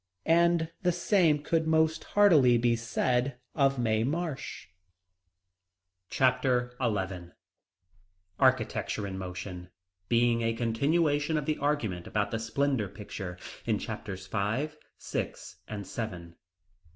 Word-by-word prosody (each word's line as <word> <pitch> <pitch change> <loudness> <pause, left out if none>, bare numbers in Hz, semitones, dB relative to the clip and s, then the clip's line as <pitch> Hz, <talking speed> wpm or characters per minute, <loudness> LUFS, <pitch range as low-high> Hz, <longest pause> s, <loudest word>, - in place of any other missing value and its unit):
And 170 0 +3
the 180 - +3
same 170 -4 +2
can 160 0 +1
most 160 0 +2
heartily 150 -12 +6
be 120 0 +2
said 125 +2 0 0.2
of 135 -2 +2
Mae 110 -2 +1
Marsh. 155 +2 -3 1.4
Chapter 125 -1 +2
XI 95 -6 -2 1.1
Architecture 125 -5 +1
in 95 -1 -5
Motion, 90 -1 -6 0.4
being 120 0 +3
a 115 0 +1
continuation 145 +6 +1
of 150 - -2
the 155 0 -1
argument 115 -12 -1
about 105 -1 -1
the 115 - -1
Splendor 120 0 0
Pictures, 95 -3 -7 0.3
in - - +2
chapters 95 -1 -6
five, 110 +10 -1 0.2
six, - - -5
and 105 -2 -6
seven. 90 -5 -6
120 Hz, 115 wpm, -29 LUFS, 105-150 Hz, 1.4 s, heartily